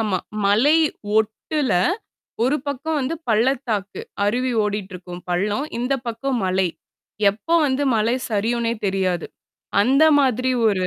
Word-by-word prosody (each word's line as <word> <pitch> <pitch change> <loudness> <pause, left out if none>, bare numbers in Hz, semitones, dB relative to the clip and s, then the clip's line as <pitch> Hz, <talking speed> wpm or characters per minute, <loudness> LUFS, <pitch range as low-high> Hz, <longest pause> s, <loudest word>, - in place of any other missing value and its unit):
ஆமா. 210 -4 0 0.3
மலை 235 +10 +4 0.4
ஒட்டுல. 225 +6 0 0.7
ஒரு 270 +4 +2
பக்கம் 285 +3 -2
வந்து 270 +5 -2
பள்ளத்தாக்கு, 225 -3 0 0.2
அருவி 250 +5 0
ஓடிட்டுருக்கும் 185 -4 -5
பள்ளம், 205 +9 0
இந்த 250 +3 -1 0.2
பக்கம் 245 +3 -2
மலை. 185 0 +1 0.6
எப்போ 225 +11 -2
வந்து 270 +1 0
மலை 225 +3 +2 0.2
சரியுனே 230 +2 0
தெரியாது. 185 -2 0 0.6
அந்த 270 +6 +3 0.2
மாதிரி 255 -1 +1 0.2
ஒரு 185 -3 0
225 Hz, 115 wpm, -22 LUFS, 200-260 Hz, 0.7 s, மலை